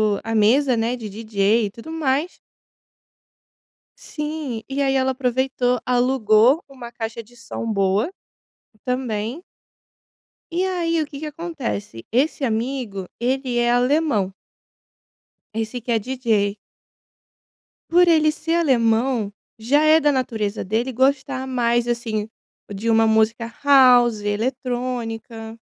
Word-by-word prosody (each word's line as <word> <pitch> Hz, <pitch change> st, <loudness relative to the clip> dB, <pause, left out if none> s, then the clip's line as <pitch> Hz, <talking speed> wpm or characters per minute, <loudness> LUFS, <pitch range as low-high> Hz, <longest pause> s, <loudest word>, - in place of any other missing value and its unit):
o -, -, -5 dB
a 225 Hz, -, -3 dB
mesa, 245 Hz, +5 st, +4 dB
né, 230 Hz, +2 st, 0 dB
de 225 Hz, -4 st, -7 dB
DJ 215 Hz, +1 st, +1 dB
e 200 Hz, -, -5 dB
tudo 235 Hz, +9 st, -10 dB
mais. 310 Hz, +1 st, -1 dB, 1.6 s
Sim. 300 Hz, -7 st, -5 dB
E 275 Hz, +1 st, -2 dB
aí 270 Hz, -1 st, +2 dB
ela 265 Hz, 0 st, +2 dB
aproveitou, 255 Hz, -1 st, 0 dB
alugou 250 Hz, +2 st, +3 dB
uma 255 Hz, -4 st, -10 dB
caixa 230 Hz, 0 st, -5 dB
de 240 Hz, +3 st, -21 dB
som 230 Hz, -1 st, -5 dB
boa, 200 Hz, -, +1 dB, 0.7 s
também 250 Hz, +2 st, -3 dB, 1.1 s
E 365 Hz, +2 st, +1 dB
aí, 335 Hz, -3 st, 0 dB
o -, -, -1 dB
que 285 Hz, -, -9 dB
que -, -, -4 dB
acontece? 290 Hz, -, -5 dB
Esse 275 Hz, +4 st, +1 dB
amigo, 225 Hz, -4 st, -2 dB
ele 255 Hz, +1 st, -1 dB
é 240 Hz, 0 st, +2 dB
alemão. 245 Hz, -6 st, +1 dB, 1.2 s
Esse 225 Hz, +2 st, -3 dB
que 240 Hz, -, -4 dB
é 225 Hz, -, +3 dB
DJ. 220 Hz, -4 st, 0 dB, 1.4 s
Por 355 Hz, +1 st, +5 dB
ele 310 Hz, -2 st, +4 dB
ser 320 Hz, +1 st, -3 dB
alemão, 240 Hz, -6 st, +2 dB, 0.3 s
já 280 Hz, +7 st, +2 dB
é 310 Hz, +1 st, +6 dB
da 295 Hz, -2 st, +2 dB
natureza 225 Hz, -5 st, -2 dB
dele 230 Hz, +6 st, -1 dB
gostar 265 Hz, +1 st, +1 dB
mais 240 Hz, -2 st, 0 dB
assim 225 Hz, -3 st, -2 dB, 0.4 s
de 210 Hz, +4 st, -3 dB
uma 225 Hz, 0 st, +4 dB
música 225 Hz, +1 st, +1 dB
house, 245 Hz, -5 st, +6 dB
eletrônica. 230 Hz, 0 st, -3 dB
245 Hz, 125 wpm, -22 LUFS, 225-270 Hz, 1.6 s, é